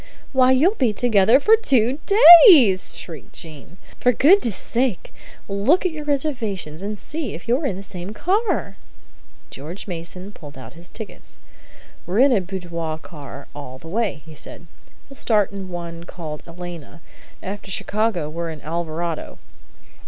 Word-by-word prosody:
"Why, 260 -1 +4
you'll 300 +10 +4
be 250 - 0
together 225 +1 +4
for 435 +9 +5
two 265 - +1 0.5
days!" 230 - +6
shrieked 160 -6 -9
Jean. 160 +2 -10 0.2
"For 250 - +3
goodness' 275 - +4
sake, 235 0 -2 0.3
look 210 - +2
at 365 - +1
your 305 -2 -7
reservations, 230 - -3
and 210 +1 -4
see 295 - -5
if 170 - -11
you're 260 +5 +1
in 195 - -3
the 195 - -8
same 180 0 -7
car!" 400 - -1 0.7
George 160 +8 -8
Mason 180 +2 -7
pulled 145 -7 -13
out 130 - -11
his 170 +1 -13
tickets. 220 -2 -10 0.7
"We're 185 +3 -2
in 270 +3 +5
a 205 - +2
boudoir 170 -4 -5
car 145 -4 -11
all 130 -3 -9
the 160 +5 -12
way," 200 -7 -2
he 160 - -12
said. 160 +3 -8 0.4
"We 275 - -14
start 210 -6 +1
in 195 -2 -7
one 170 -1 -7
called 155 -4 -8
'Elena.' 170 -1 -10 0.4
After 200 +1 -7
Chicago 205 -3 -1
we're 165 +2 -5
in 160 -1 -8
'Alvarado.'" 165 0 -4
190 Hz, 150 wpm, -21 LUFS, 170-245 Hz, 0.7 s, days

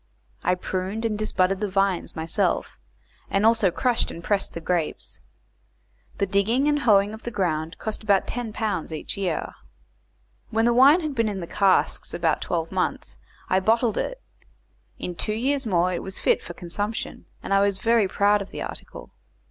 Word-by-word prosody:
I 180 - +2
pruned 190 +4 -3
and 220 -2 0
disbudded 195 -3 +1
the 210 - -1
vines 195 -2 0
myself, 160 0 -1 0.5
and 195 +2 +2
also 225 -4 +5
crushed 245 +6 0
and 170 - -8
pressed 200 +1 0
the - - -3
grapes. 170 -1 -2 1.0
The 200 - +1
digging 210 +8 +2
and 295 0 +2
hoeing 205 -5 +4
of 220 - -9
the - - -4
ground 165 -6 -1
cost 220 -1 -4
about 200 -3 +3
10 240 -2 -4
pounds 210 -7 -2
each 155 - -4
year. 185 -5 -2 1.0
When 225 0 +1
the 240 - +4
wine 280 +8 +7
had 305 -3 -3
been 230 -4 +1
in 200 -2 -4
the 170 - -4
casks 195 +2 +1
about 165 -3 +1
twelve 165 -2 -2
months 185 -1 -2 0.3
I 185 - +3
bottled 225 +3 +2
it; - - -3 0.8
in 180 - -4
two 210 +5 -2
years 265 +2 0
more 180 -2 +2
it 175 - -2
was 190 0 -3
fit - - +2
for 175 - -9
consumption, 205 +6 -4 0.2
and - - -1
I 195 - +5
was 200 -1 +2
very 225 0 +3
proud 205 +2 +3
of 195 - -7
the - - -5
article. - - -7
200 Hz, 180 wpm, -24 LUFS, 185-225 Hz, 1.0 s, wine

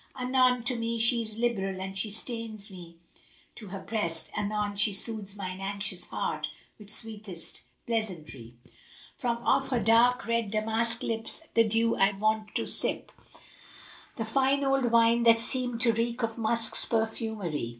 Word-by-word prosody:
Anon 250 -1 +3
to 250 +1 0
me 230 0 -2
she 230 +1 +4
is 220 -1 -6
liberal 195 -5 -1
and 190 0 -5
she 210 +3 -1
strains 220 -1 -2
me 170 -3 -12 0.6
to 215 - -10
her 195 +1 -6
breast; 180 -7 -1
* - - -11
Anon 210 0 -1
she 205 +1 +3
soothes 205 -1 +4
mine 185 -2 -5
anxious 195 -2 -2
heart - - -2 0.3
with 205 -1 -8
sweetest 210 -6 0 0.2
pleasantry: 165 - -4 0.6
From 240 -3 -1
off 270 0 +3
her 250 -3 0
dark 235 +3 +4
red 230 -2 0
damask 225 +2 0
lips 225 +6 -3
the 230 - +5
dew 225 +1 +2
I 195 +1 +4
wont 215 +1 -1
to - - 0
sip - - -3 0.5
* - - -21
The 225 - -2
fine 270 +4 +2
old 270 -1 +2
wine 230 0 +4
that 230 -1 +6
seemed 245 0 -3
to 230 -2 +3
reek 235 +2 -2
of 225 -1 -1
musk's 230 0 -1
perfumery. 220 - -2
225 Hz, 160 wpm, -28 LUFS, 200-235 Hz, 0.6 s, that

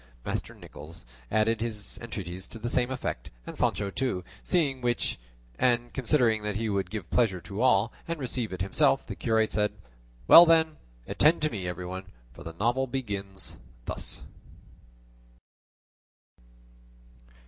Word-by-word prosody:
Master - - -3
Nicholas 80 +1 -11 0.2
added 110 +1 +2
his 110 -3 -2
entreaties 95 -5 -5
to - - -8
the 120 +2 -3
same 125 -1 +2
effect, 130 - -4 0.2
and - - -7
Sancho 100 -1 +1
too; 110 -6 -1 0.2
seeing 145 -8 +1
which, 120 - 0 0.4
and 120 -1 +2
considering 125 -4 +2
that 105 -1 -3
he 110 +1 -1
would 100 -3 -1
give 105 -4 -5
pleasure 110 -7 +2
to 100 +5 -5
all, 120 -3 +3
and 165 -1 -3
receive 125 -4 -2
it 95 0 -3
himself, 95 - +2
the - - -6
curate 110 -1 +1
said, 105 -1 +1 0.5
"Well 170 +1 +11
then, 160 -1 +4 0.3
attend 155 +1 +3
to 155 - +2
me 95 -5 -4
everyone, 90 +2 -5 0.3
for - - -12
the 80 - -7
novel 120 +9 0
begins 100 -7 -4 0.3
thus." - - -2
110 Hz, 140 wpm, -28 LUFS, 95-125 Hz, 0.5 s, Well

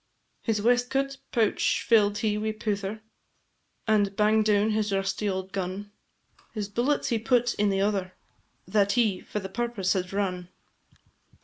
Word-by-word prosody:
His 210 -3 -1
waistcoat 250 +3 +1
pouch 225 -4 +1
fill'd 205 -3 +4
he 215 -1 0
wi' 215 +1 -2
pouther, 210 -1 -3 0.9
And 205 -2 +2
bang'd 215 +1 +3
down 210 0 +3
his 215 -1 0
rusty 195 +1 -1
auld 190 0 -3
gun; 195 +2 -4 0.6
His 210 -2 -2
bullets 245 +8 0
he 230 -3 +1
put 245 +1 +2
in 210 0 +1
the 195 0 +1
other, 195 -2 -1 0.5
That 200 -1 +2
he 215 -6 +1
for 210 - -4
the 190 - -6
purpose 220 -1 -1
had 185 -2 -2
run. 185 -3 -2
210 Hz, 145 wpm, -27 LUFS, 195-220 Hz, 0.9 s, fill'd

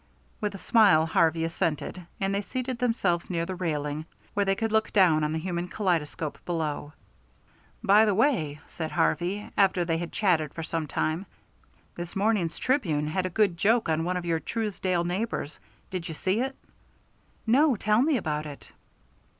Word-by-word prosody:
With 210 -2 -2
a - - -5
smile 195 -7 +5
Harvey 165 0 +2
assented, 165 +2 -2
and 195 0 0
they 200 - 0
seated 255 +3 -4
themselves 195 -8 0
near 170 -2 -1
the 185 - -4
railing, 155 -3 -3 0.3
where 205 - +2
they 195 0 +2
could 225 +1 -2
look 220 0 +2
down 175 -6 +4
on 150 - 0
the 160 - -1
human 175 +1 -3
kaleidoscope 165 -6 -2
below. 155 -3 -3 0.9
"By 210 +3 +6
the 210 -3 +2
way," 170 - +1
said 160 -2 -5
Harvey, 195 +4 0
after 190 -3 +3
they 165 -1 0
had 170 0 -5
chatted 160 -8 +1
for 165 - -4
some 160 -1 -3
time, 160 +7 -1 0.7
"this 175 0 -7
morning's 195 -5 +1
Tribune 165 - 0
has 185 +4 -1
a - - -1
good 190 -2 +2
joke 220 +6 +3
on 160 0 +1
one 180 +2 -1
of 175 - -4
your 165 -1 +1
Truesdale 185 -1 -1
neighbors. 175 -4 -3 0.3
Did 180 -2 -4
you 160 - -5
see 190 +6 0
it?" 265 +1 -2 0.9
"No. 265 +4 +4
Tell 215 +2 +2
me 290 0 +3
about 155 -6 -2
it." 145 -1 -11
180 Hz, 175 wpm, -27 LUFS, 160-210 Hz, 0.9 s, By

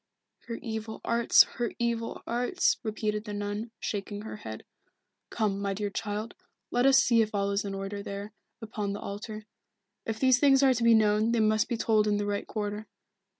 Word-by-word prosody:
"Her 230 - -4
evil 220 -1 -5
arts, 235 0 +6
her 240 -1 -1
evil 235 -1 -2
arts," 245 +10 +1
repeated 215 -2 -2
the 210 -2 -5
nun, 205 +2 -3
shaking 205 0 -4
her 220 - -7
head. 110 - -8 0.7
"Come, 205 -3 -1
my 200 -1 -1
dear 205 0 -3
child, 210 +2 -4 0.4
let 245 +2 +3
us 270 -1 +6
see 235 -3 +4
if 215 -1 -1
all 200 0 0
is 200 +1 0
in 200 -1 -4
order 195 +1 -5
there, 200 +1 -6 0.3
upon 210 -2 -3
the 205 - -5
altar. 215 +1 -7 0.6
If 220 -1 -3
these 260 -2 +4
things 275 0 +5
are 265 -1 +6
to 235 -1 -2
be 230 -1 +6
known 215 +1 +3
they 235 - +2
must 215 0 +2
be 235 - -1
told 215 -2 +2
in 205 -1 +2
the 205 - -1
right 205 0 -2
quarter. 210 0 -4
215 Hz, 195 wpm, -28 LUFS, 205-230 Hz, 0.7 s, arts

